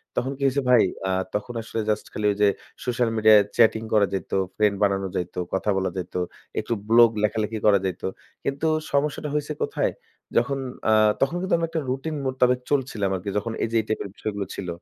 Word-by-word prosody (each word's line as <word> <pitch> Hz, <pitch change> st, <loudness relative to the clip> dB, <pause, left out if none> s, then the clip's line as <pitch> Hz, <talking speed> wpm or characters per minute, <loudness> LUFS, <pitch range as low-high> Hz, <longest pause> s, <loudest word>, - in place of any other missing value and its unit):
তখন 130 Hz, +2 st, 0 dB
কি -, -, -15 dB
হইছে 140 Hz, +1 st, +1 dB
ভাই, 125 Hz, -3 st, +7 dB, 0.2 s
আ -, -, 0 dB, 0.2 s
তখন 105 Hz, +4 st, -3 dB
আসলে 115 Hz, -, -5 dB
just 105 Hz, 0 st, 0 dB
খালি 105 Hz, -, -3 dB
ওই -, -, -2 dB
যে 105 Hz, -, +6 dB, 0.4 s
social 120 Hz, -1 st, +1 dB
media-য় 110 Hz, -1 st, +7 dB
chatting 110 Hz, -1 st, +4 dB
করা 105 Hz, -2 st, +5 dB
যাইত, 95 Hz, -3 st, -4 dB, 0.3 s
friend 105 Hz, -1 st, +3 dB
বানানো 95 Hz, -1 st, +1 dB
যাইত, 90 Hz, -1 st, -3 dB, 0.2 s
কথা 95 Hz, +2 st, 0 dB
বলা 95 Hz, -1 st, 0 dB
যাইত, 90 Hz, -1 st, -6 dB, 0.4 s
একটু 115 Hz, -, -2 dB, 0.2 s
blog 115 Hz, 0 st, +7 dB
লেখালেখি 110 Hz, +1 st, 0 dB
করা 105 Hz, -2 st, +6 dB
যাইত। 90 Hz, -2 st, -3 dB, 0.4 s
কিন্তু 140 Hz, +3 st, -1 dB, 0.2 s
সমস্যাটা 145 Hz, +1 st, 0 dB
হইছে 150 Hz, 0 st, -1 dB
কোথায়? 450 Hz, +3 st, -1 dB, 0.4 s
যখন 140 Hz, -1 st, +1 dB, 0.3 s
আ -, -, +5 dB, 0.3 s
তখন 140 Hz, +6 st, +2 dB
কিন্তু 185 Hz, -, +2 dB
আমি 165 Hz, -, 0 dB
একটা 160 Hz, -1 st, -2 dB
routine 140 Hz, +4 st, -2 dB
মোতাবেক 125 Hz, -1 st, +2 dB
চলছিলাম 125 Hz, -8 st, 0 dB
আরকি, 95 Hz, +2 st, -4 dB
যখন 115 Hz, +2 st, -2 dB
এই 115 Hz, -, -1 dB
যেই 110 Hz, -1 st, +3 dB
type-এর 110 Hz, -2 st, -2 dB
বিষয়গুলো 100 Hz, -2 st, -3 dB
ছিল। 95 Hz, -, -5 dB
110 Hz, 190 wpm, -24 LUFS, 100-135 Hz, 0.4 s, ভাই